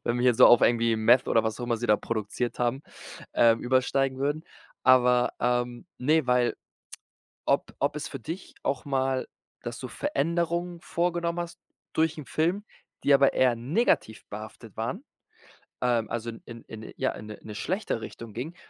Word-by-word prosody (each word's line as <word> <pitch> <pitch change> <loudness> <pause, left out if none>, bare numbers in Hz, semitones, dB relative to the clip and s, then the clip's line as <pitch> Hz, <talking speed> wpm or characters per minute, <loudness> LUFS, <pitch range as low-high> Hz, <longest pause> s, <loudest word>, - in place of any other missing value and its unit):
wenn 120 - 0
wir - - 0
hier 125 -2 +5
so - - +8
auf 120 - +7
irgendwie 115 -1 +3
Meth 120 +3 +4
oder 115 - +3
was 110 -1 -2
auch - - -2
immer 120 -1 0
sie 120 +2 -3
da 105 -2 +5
produziert 115 +2 -3
haben, 125 +3 0 0.5
ähm, 115 -1 +5
übersteigen 130 +1 +1
würden. 145 +4 -1 0.4
Aber, 125 -1 +5
ähm, 120 +3 0
ne, 155 +2 +2
weil 125 -1 +2 0.9
ob - - +1
ob 145 +2 0
es 150 - -4
für 135 - -7
dich 165 +9 -7
auch 140 - -1
mal 135 -1 0 0.4
dass - - -5
du - - -5
Veränderungen 170 +3 -1
vorgenommen 170 0 -1
hast 170 -1 -6 0.3
durch 160 0 +2
'n 150 - -7
Film, 175 +9 0 0.4
die 140 - +5
aber 140 0 +5
eher 125 -2 +3
negativ 125 - 0
behaftet 110 +1 -9
waren, 120 - -3 0.8
ähm, 120 -3 +1
also 120 0 -3
in 115 - -12 0.2
in 110 -1 -10
in - - -10
ja, - - +1
in 105 - -9
'ne 105 - -8
'ne 105 - -9
schlechte 180 - -2
Richtung 115 -2 -9
gingen. 140 +10 -5
125 Hz, 175 wpm, -27 LUFS, 115-155 Hz, 0.9 s, so